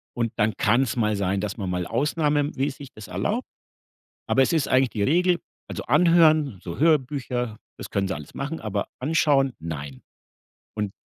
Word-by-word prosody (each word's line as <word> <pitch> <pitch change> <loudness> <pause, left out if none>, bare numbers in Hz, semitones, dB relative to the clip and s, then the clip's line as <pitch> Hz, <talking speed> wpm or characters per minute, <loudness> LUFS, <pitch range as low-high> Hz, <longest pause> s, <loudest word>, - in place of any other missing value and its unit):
und 115 -1 -1
dann 110 0 +2
kann's 120 +5 +2
mal 110 -3 +1
sein, 100 -1 0
dass 105 0 -4
man 100 -4 -3
mal 90 -1 -2
Ausnahmemäßig 145 0 -1
das 110 -1 -10
erlaubt. 155 - -2 0.8
Aber 135 - +4
es 135 - +1
ist 160 -4 +1
eigentlich 130 -1 +3
die 105 - -2
Regel, 175 - +3 0.3
also, - - -5
anhören, 155 - +4
so 85 -2 -6
Hörbücher, 130 -7 +1 0.2
das - - -8
können 95 -1 0
sie 95 - -1
alles 75 -3 -10
machen, 150 +4 -4
aber 105 -2 -3
anschauen, 140 -2 +2
nein. 70 -5 -6 0.7
Und 105 -2 -2
125 Hz, 165 wpm, -24 LUFS, 100-150 Hz, 0.8 s, Aber